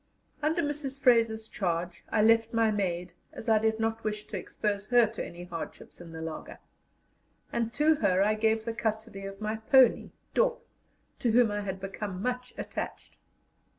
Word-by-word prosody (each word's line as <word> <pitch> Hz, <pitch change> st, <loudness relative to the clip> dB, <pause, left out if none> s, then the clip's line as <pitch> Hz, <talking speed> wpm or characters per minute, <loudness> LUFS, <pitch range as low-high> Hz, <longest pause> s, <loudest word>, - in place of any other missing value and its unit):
Under 315 Hz, +3 st, +1 dB
Mrs. 290 Hz, -2 st, -3 dB
Fraser's 230 Hz, -4 st, +3 dB
charge 175 Hz, -6 st, -2 dB
I 215 Hz, -, +2 dB
left 225 Hz, +1 st, +4 dB
my 225 Hz, -1 st, +4 dB
maid, 180 Hz, -4 st, -2 dB, 0.2 s
as 225 Hz, -, -9 dB
I 220 Hz, -1 st, +5 dB
did 220 Hz, 0 st, +1 dB
not 225 Hz, 0 st, -1 dB
wish 210 Hz, -1 st, -3 dB
to -, -, -7 dB
expose 205 Hz, -1 st, -2 dB
her 245 Hz, -1 st, +6 dB
to 220 Hz, +1 st, -5 dB
any 175 Hz, 0 st, -8 dB
hardships 175 Hz, 0 st, -8 dB
in 170 Hz, -1 st, -10 dB
the 160 Hz, 0 st, -6 dB
laager; 160 Hz, -1 st, -6 dB, 1.0 s
and 230 Hz, -1 st, 0 dB
to 305 Hz, +2 st, +4 dB
her 195 Hz, -5 st, +3 dB
I 210 Hz, +1 st, +3 dB
gave 220 Hz, 0 st, +1 dB
the 230 Hz, -, -2 dB
custody 220 Hz, -3 st, -3 dB
of 195 Hz, 0 st, -9 dB
my 215 Hz, +1 st, -2 dB
pony 250 Hz, +2 st, +4 dB, 0.2 s
Dop, -, -, +1 dB, 0.5 s
to 240 Hz, -, +1 dB
whom 240 Hz, -2 st, +5 dB
I 205 Hz, 0 st, -2 dB
had 190 Hz, -2 st, -4 dB
become 195 Hz, 0 st, -5 dB
much 250 Hz, +3 st, -2 dB
attached. -, -, -6 dB
220 Hz, 175 wpm, -29 LUFS, 195-235 Hz, 1.0 s, her